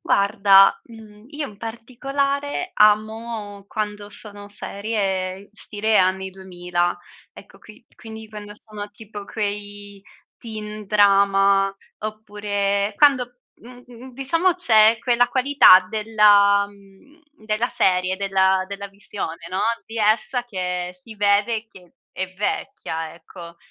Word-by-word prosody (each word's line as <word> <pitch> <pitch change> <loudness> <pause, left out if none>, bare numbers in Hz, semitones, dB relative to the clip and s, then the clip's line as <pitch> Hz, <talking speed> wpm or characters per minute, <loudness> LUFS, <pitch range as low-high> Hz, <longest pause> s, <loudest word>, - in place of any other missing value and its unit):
Guarda, 200 -1 +4
mhmm, 220 -2 -15
io 295 -1 -5
in 205 - -14
particolare 275 - -3
amo 215 -1 +1
quando 210 -1 -5
sono 205 -1 -3
serie 200 -2 -3
stile 215 0 -1
anni 190 +1 +1
2000. 180 -2 -3 0.4
Ecco - - -16
qui 215 +2 -17
quindi 220 -1 -10
quando 205 -1 -9
sono 210 -1 -9
tipo 205 -1 -10
quei 205 -1 -6 0.4
teen 215 -2 -8
drama 195 -1 +3 0.3
oppure 205 -1 -2
quando, 250 -4 +2
mhmm, 250 +1 -14
diciamo 330 +8 +1
c'è 225 -10 +5
quella 245 0 +2
qualità 260 -6 +6
della 205 -1 +4
mhmm, 200 - -21 0.2
della 215 +2 -1
serie, 185 -3 +1
della 190 -1 +1
della 200 0 -6
visione, 195 -4 -7
no, 185 - -3 0.3
di 225 - -9
essa 220 +4 +1
che 180 -5 -4
si 195 +5 -14
vede 210 +2 +1
che 180 -6 -18 0.2
è 185 0 -5
vecchia, 160 -5 -4
ecco. 170 0 -13
210 Hz, 115 wpm, -22 LUFS, 195-225 Hz, 0.4 s, qualità